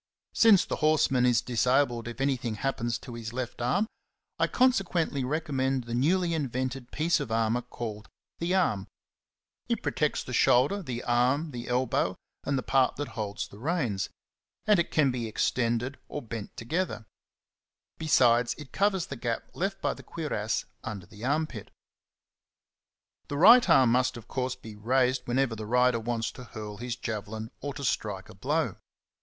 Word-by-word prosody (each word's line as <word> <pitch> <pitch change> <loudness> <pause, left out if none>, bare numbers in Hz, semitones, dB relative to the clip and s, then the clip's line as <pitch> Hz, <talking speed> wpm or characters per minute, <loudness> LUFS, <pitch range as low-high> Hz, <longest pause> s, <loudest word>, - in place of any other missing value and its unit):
Since 215 -5 +6
the - - -3
horseman 140 -5 +3
is 120 -2 +3
dis 120 0 0
abled 125 -3 +2
if 120 +2 -7
anything 130 -5 0
happens 120 -1 -1
to 125 - -10
his 115 -1 -6
left 120 -1 -4
arm, 175 - +2 0.5
I - - +3
consequently 185 - +2
recommend 135 -2 -1
the 115 0 -6
newly 170 +7 +2
invented 130 -3 -3
piece 160 +2 +1
of 140 -6 -4
armour 115 +1 +1
called 110 -3 -7 0.3
t/ie 170 - -2
arm^'' 180 - +1 0.8
It - - -1
protects - - 0
the - - -7
shoulder, 140 +12 +4
the 125 -7 -5
arm, 130 +6 +2
the 120 -2 -6
elbow, 125 +1 +1 0.3
and 140 0 0
the 130 - -2
part 135 -2 +2
that 145 0 -4
holds 105 -2 -4
the 100 - -14
reins, 125 - -1 0.6
and 210 -4 +5
it 170 - +1
can 145 -4 +3
be 120 -2 -3
ex 110 - +1
tended 120 +2 -1
or 150 - -5
bent 115 -2 -7
together; 125 -1 -2 0.9
besides 125 -6 +4
it 150 -4 -11
covers 195 -3 +1
the 140 - -6
gap 120 -2 -3
left 195 +2 -3
by - - +1
the - - -12
cuirass 110 -10 -2 0.2
under 100 -4 -6
the 105 +4 -13
armpit. 145 -4 -1 1.6
The 145 - -3
right 235 - +8
arm 125 -3 +6
must 125 0 +2
of 115 - -11
course 130 0 -2
be 110 -4 -11
raised 125 +4 +1
whenever 125 -1 +1
the 110 -1 -6
rider 125 0 +3
wants 115 0 -2
to 125 - -11
hurl 105 -2 -7
his 120 +1 -4
javelin 110 -1 -5
or 145 0 -5
to 140 - -6
strike 100 -7 -2
a - - -11
blow. 135 - -1
125 Hz, 170 wpm, -28 LUFS, 115-145 Hz, 1.6 s, right